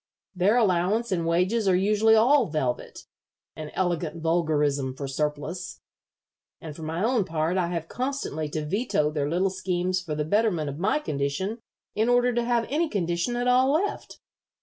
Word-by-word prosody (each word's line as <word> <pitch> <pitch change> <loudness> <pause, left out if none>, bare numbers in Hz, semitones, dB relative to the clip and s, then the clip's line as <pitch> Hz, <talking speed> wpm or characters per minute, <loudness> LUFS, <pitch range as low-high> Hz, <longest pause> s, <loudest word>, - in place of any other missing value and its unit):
Their 195 +6 +3
allowance 210 +2 +1
and 170 -3 0
wages 185 +6 +1
are 185 - +4
usually 210 +4 +4
all 260 +6 +4
velvet 135 -6 -3 0.5
an 155 -1 -7
elegant 175 -3 -1
vulgarism 150 -5 0
for 140 +1 -5
surplus 150 +5 -3 0.8
and 155 -2 -8
for 160 - -10
my 160 +4 -3
own 235 -2 +2
part 165 0 -1
I 180 -2 +1
have 170 -2 -4
constantly 250 - -3
to 155 0 -3
veto 170 -4 0
their 145 -2 -1
little 185 +4 +1
schemes 185 -1 -1
for 160 -5 -4
the 150 0 -2
betterment 175 -5 +1
of 140 - -9
my 205 +10 +2
condition 190 - -2 0.3
in 220 +3 +1
order 245 0 +3
to 240 0 0
have 235 -1 +1
any 315 +3 0
condition 175 - -1
at 245 +1 -1
all 255 +2 +4
left. 390 +6 -2
180 Hz, 170 wpm, -26 LUFS, 155-225 Hz, 0.8 s, are